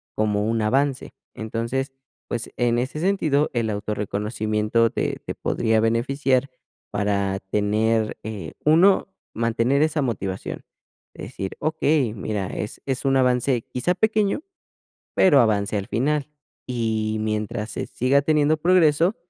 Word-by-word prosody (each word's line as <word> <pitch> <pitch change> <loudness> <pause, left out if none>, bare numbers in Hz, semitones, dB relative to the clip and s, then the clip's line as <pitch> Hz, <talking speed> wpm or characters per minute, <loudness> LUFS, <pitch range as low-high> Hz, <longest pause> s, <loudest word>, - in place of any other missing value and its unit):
como 105 -1 +1
un 115 -1 0
avance. 135 +5 0 0.2
Entonces, 115 +4 -3 0.4
pues, 120 -1 -4
en 120 -1 +2
ese 130 +5 -3
sentido, 155 -6 +1
el 115 -3 0
auto 105 +1 -3
reconocimiento 105 +2 0
te - - -2
te - - -4
podría 110 -1 +1
beneficiar 130 +4 +1 0.4
para 100 -1 0
tener, 110 +2 +1
eh, 110 -2 -6
1, 180 +6 +5 0.2
mantener 115 +4 +1
esa 155 0 +1
motivación, 95 -6 -4 0.5
decir: 95 0 -6
"Okey, 155 -6 +1
mira, 105 -2 -3
es 105 - -5
es 135 -2 -2
un 135 0 +3
avance 125 -1 +2
quizá 175 +8 0
pequeño, 215 - +1 0.7
pero 145 -8 +6
avance 105 -2 +1
al 100 - -4
final", 145 +4 0 0.4
y 110 -3 -1
mientras 110 +1 -2
se - - -4
siga 130 +3 +2
teniendo 155 +1 +2
progreso, 170 +2 +3
120 Hz, 125 wpm, -23 LUFS, 110-145 Hz, 0.7 s, pero